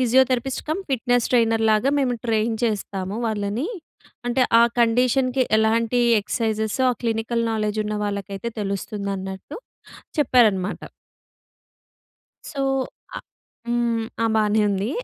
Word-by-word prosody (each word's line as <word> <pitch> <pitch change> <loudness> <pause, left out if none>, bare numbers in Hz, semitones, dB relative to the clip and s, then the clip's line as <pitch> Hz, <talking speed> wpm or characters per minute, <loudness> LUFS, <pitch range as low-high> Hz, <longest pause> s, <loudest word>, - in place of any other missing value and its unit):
Physiotherapist 255 +1 +2
cum, 320 +5 -1
fitness 245 -1 +1
trainer 225 -2 +3
లాగా 215 +6 +3
మేము 255 -3 +1
train 225 0 +1
చేస్తాము 200 -3 -2
వాళ్ళని. 215 +5 -2 0.6
అంటే, 250 +2 +2 0.2
ఆ - - +7 0.2
కండిషన్‌కి, 255 +2 +2 0.2
ఎలాంటి 230 +2 +2 0.2
ఎక్సర్సైజ్సో 220 +3 -1
ఆ - - -6
క్లినికల్ 230 +1 0
నౌలెడ్జ్ 215 -1 -1
ఉన్న 210 0 -2
వాళ్ళకైతే 200 +2 -4
తెలుస్తుందన్నట్టు 195 +2 -4 0.6
చెప్పారన్నమాట. 215 -9 +3 1.7
సో, 285 -4 -5 0.6
అ - - -2 0.5
హ్మ్. 235 -1 0 0.2
ఆ! 230 - +3
బానే 215 0 +2
ఉంది. 200 +4 -1
225 Hz, 110 wpm, -23 LUFS, 210-245 Hz, 1.7 s, ఆ